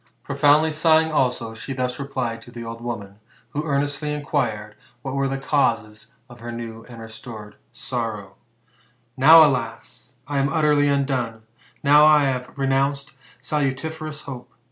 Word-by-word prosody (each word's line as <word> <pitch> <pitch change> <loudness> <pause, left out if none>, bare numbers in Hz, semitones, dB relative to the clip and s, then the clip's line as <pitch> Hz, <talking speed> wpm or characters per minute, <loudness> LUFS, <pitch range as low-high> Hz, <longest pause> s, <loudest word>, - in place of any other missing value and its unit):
Profoundly 145 +2 +3
sighing 160 +1 +3
also, 125 -6 0
she 115 +4 -6
thus 125 0 -2
replied 130 -5 -3
to 120 - -14
the 120 -1 -8
old 115 0 -7
woman, 105 -4 -6 0.3
who 150 +3 -3
earnestly 145 0 -1
inquired 110 -8 -2 0.3
what 135 - -4
were 140 0 0
the 135 0 -2
causes 115 -6 -1
of 120 -1 -14
her 120 +1 -7
new 115 -1 -7
and 120 -2 -10
restored 110 -1 -10 0.2
sorrow: 115 -5 -5 0.5
*' 110 - -34 0.3
Now, 155 +4 +8
alas! 125 -1 -4
I 145 -1 -1
am 135 0 +1
utterly 150 -1 +3
undone, 130 -5 -1 0.4
now 150 +1 +7
I 150 -1 +6
have 130 -1 -2
renounced 135 +1 0 0.3
salutiferous 150 +2 -3
hope. 125 -3 -9
135 Hz, 145 wpm, -22 LUFS, 115-145 Hz, 0.5 s, Now